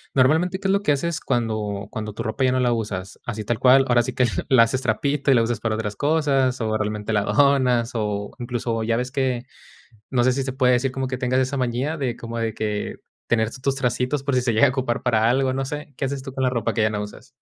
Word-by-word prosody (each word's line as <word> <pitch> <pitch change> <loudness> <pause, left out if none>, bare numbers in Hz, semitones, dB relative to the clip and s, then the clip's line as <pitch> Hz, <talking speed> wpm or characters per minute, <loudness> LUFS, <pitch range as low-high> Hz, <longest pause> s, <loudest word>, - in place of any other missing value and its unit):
Normalmente, 160 +8 +3
¿qué 195 - -2
es - - +3
lo 200 0 +2
que 150 - +2
haces 160 +3 -2
cuando 105 -4 -2
cuando 110 -1 -5
tu 115 - -5
ropa 110 +4 -2
ya 130 - +3
no 130 - +1
la 120 -1 +2
usas? 100 -4 -4
Así 110 -3 -3
tal 120 +1 -1
cual, 130 +1 +6
ahora 120 -1 +4
sí 120 - -4
que 125 - +3 0.2
la 125 -3 +7
haces 130 +3 -1
trapito 140 +5 0
y 135 - +6
la 115 - +4
usas 115 -1 -1
para 110 -1 -1
otras 105 -2 -3
cosas, 140 -3 +1
o 110 -1 -1
realmente 105 0 -2
la 105 - +3
donas, 130 -2 +3
o 105 -3 -2
incluso, 120 -2 -2
ya 115 +1 0
ves 125 +1 -3
que, 130 -3 -1 0.7
no 125 -2 +2
sé 130 - +4
si 135 +2 -1
se 130 -1 -4
puede 130 -1 +3
decir 125 +1 +1
como 135 0 -2
que 130 0 -3
tengas 125 +1 +1
esa 130 +2 -1
manía 130 +5 -1 0.2
como 115 0 -6
de 115 -1 -1
que 105 -1 -3 0.3
tener 110 -1 +1
tus 135 +1 0
tracitos 125 +2 -1
por 140 -1 -1
si 125 - +3
se 120 -2 +1
llega 110 +6 +5
a - - +2
ocupar 130 -2 -1
para 115 -3 +2
algo, 130 +1 +1
no 135 +1 -2
sé. 150 0 -7
¿Qué - - -1
haces 135 0 -3
tú 135 0 -8
con 130 0 -3
la 130 - +2
ropa 115 -4 -1
que 115 - +2
ya 110 - +2
no 105 -1 -2
usas? 105 +5 -9
125 Hz, 260 wpm, -23 LUFS, 110-135 Hz, 0.7 s, la